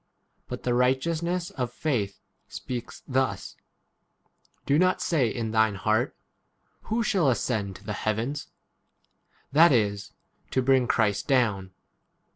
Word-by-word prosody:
6 -, -, -43 dB
But -, -, -6 dB
the 125 Hz, -, +1 dB
righteousness 165 Hz, +8 st, 0 dB
of 125 Hz, -2 st, -3 dB
faith 115 Hz, -9 st, -2 dB, 0.3 s
speaks 125 Hz, -2 st, -7 dB
thus: 130 Hz, 0 st, -1 dB, 1.1 s
Do 145 Hz, +2 st, +3 dB
not 185 Hz, 0 st, +3 dB
say 140 Hz, -9 st, +1 dB
in 110 Hz, 0 st, -3 dB
thine 110 Hz, -2 st, +3 dB
heart, 110 Hz, +5 st, 0 dB, 0.7 s
Who 230 Hz, +2 st, 0 dB
shall 190 Hz, -9 st, +2 dB
ascend 110 Hz, -6 st, -1 dB
to -, -, -13 dB
the 105 Hz, -, -4 dB
heavens? 115 Hz, +8 st, -2 dB, 1.0 s
That 160 Hz, +4 st, +6 dB
is, 105 Hz, -5 st, 0 dB, 0.4 s
to 130 Hz, -, 0 dB
bring 130 Hz, -1 st, +4 dB
7 -, -, -6 dB
Christ 105 Hz, -4 st, +1 dB
down. 105 Hz, -8 st, +1 dB
125 Hz, 130 wpm, -26 LUFS, 110-145 Hz, 1.1 s, That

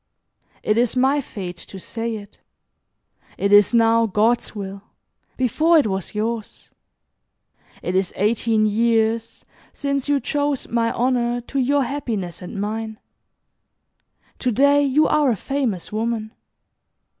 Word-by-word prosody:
'" -, -, -37 dB
"It 215 Hz, -, +3 dB
is 240 Hz, 0 st, +1 dB
my 265 Hz, +3 st, +3 dB
fate 185 Hz, -8 st, -7 dB
to 195 Hz, -, -10 dB
say 230 Hz, +4 st, -4 dB
it. 205 Hz, -1 st, -11 dB, 1.0 s
It 200 Hz, +1 st, +1 dB
is 205 Hz, -1 st, +7 dB
now 230 Hz, -1 st, +4 dB
God's 220 Hz, +4 st, +1 dB
will. 195 Hz, -1 st, -6 dB, 0.6 s
Before 310 Hz, +7 st, +3 dB
it 300 Hz, -, +4 dB
was 195 Hz, -1 st, -3 dB
yours. 220 Hz, 0 st, -4 dB, 1.1 s
It 180 Hz, -, -2 dB
is 190 Hz, -1 st, +1 dB
eighteen 215 Hz, +1 st, +2 dB
years 225 Hz, +1 st, +1 dB, 0.3 s
since 280 Hz, -1 st, -2 dB
you 285 Hz, -1 st, +3 dB
chose 285 Hz, -1 st, -1 dB
my 230 Hz, 0 st, 0 dB
honor 245 Hz, -1 st, 0 dB
to 270 Hz, +3 st, -4 dB
your 280 Hz, +2 st, +2 dB
happiness 220 Hz, -, -4 dB
and 180 Hz, +2 st, -7 dB
mine. 220 Hz, +1 st, -3 dB, 1.4 s
To 250 Hz, -, 0 dB
day 280 Hz, +5 st, +4 dB
you 285 Hz, +2 st, +3 dB
are 295 Hz, -3 st, +3 dB
a 235 Hz, -, +2 dB
famous 235 Hz, -5 st, -3 dB
woman. 220 Hz, 0 st, -2 dB
230 Hz, 135 wpm, -22 LUFS, 210-265 Hz, 1.4 s, is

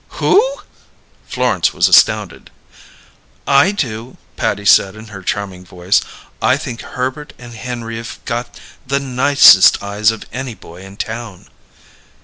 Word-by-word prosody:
"Who?" 400 Hz, -, +4 dB, 0.9 s
Florence -, -, 0 dB
was -, -, +3 dB
astounded. -, -, +2 dB, 1.0 s
"I 190 Hz, -, +4 dB
do," 120 Hz, -, -5 dB, 0.2 s
Patty 100 Hz, 0 st, -2 dB
said 95 Hz, 0 st, +4 dB
in 110 Hz, 0 st, -12 dB
her 95 Hz, -2 st, -10 dB
charming 95 Hz, -1 st, -4 dB
voice. 90 Hz, +1 st, 0 dB, 0.4 s
"I 130 Hz, -, +2 dB
think 125 Hz, -5 st, -7 dB
Herbert 130 Hz, +4 st, -5 dB
and 120 Hz, -1 st, -12 dB
Henry've 115 Hz, -1 st, -7 dB
got 120 Hz, +1 st, -5 dB, 0.3 s
the 140 Hz, +2 st, 0 dB
nicest 130 Hz, -8 st, +5 dB
eyes 100 Hz, +2 st, +1 dB
of 115 Hz, -1 st, -4 dB
any 130 Hz, -2 st, -5 dB
boy 85 Hz, -1 st, -14 dB
in 95 Hz, +1 st, -13 dB
town." 110 Hz, -4 st, -7 dB
115 Hz, 130 wpm, -16 LUFS, 100-130 Hz, 1.0 s, nicest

